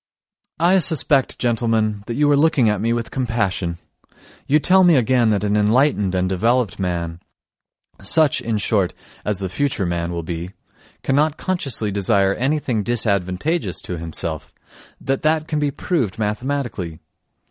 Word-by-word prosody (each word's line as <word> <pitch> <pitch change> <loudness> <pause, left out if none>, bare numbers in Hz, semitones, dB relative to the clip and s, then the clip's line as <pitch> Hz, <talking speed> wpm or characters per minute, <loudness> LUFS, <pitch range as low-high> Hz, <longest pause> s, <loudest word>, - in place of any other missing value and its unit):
I 175 +4 +4
suspect, 150 -5 +2
gentlemen, 115 -3 0
that 115 - -3
you 145 +2 +2
are - - +5
looking 145 -4 +3
at 105 -2 -1
me 115 +1 0
with 115 -1 -2
compassion; 100 -9 -1 0.7
you 145 - +4
tell 185 +5 +4
me 175 -3 +6
again 125 -2 +3
that 105 -1 +1
an 105 0 +1
enlightened 105 -2 +2
and 90 0 +1
developed 110 +3 0
man, 85 -3 -3 0.8
such, 145 +6 +2
in 115 -3 -1
short, 100 -3 0 0.3
as 105 -2 -1
the 95 0 -3
future 130 0 -1
man 85 0 -2
will 85 -1 -4
be, 85 +3 -5 0.5
cannot 145 +3 +1
consciously 135 - -1
desire 100 0 +2
anything 130 -3 -1
disadvantageous 100 - -1
to 90 -2 -5
himself, 80 -1 -4 0.5
that 135 0 -2
that 155 0 +1
can 150 - -1
be 145 -1 +1
proved 135 - -2
mathematically. 110 - -3
115 Hz, 145 wpm, -20 LUFS, 95-140 Hz, 0.8 s, me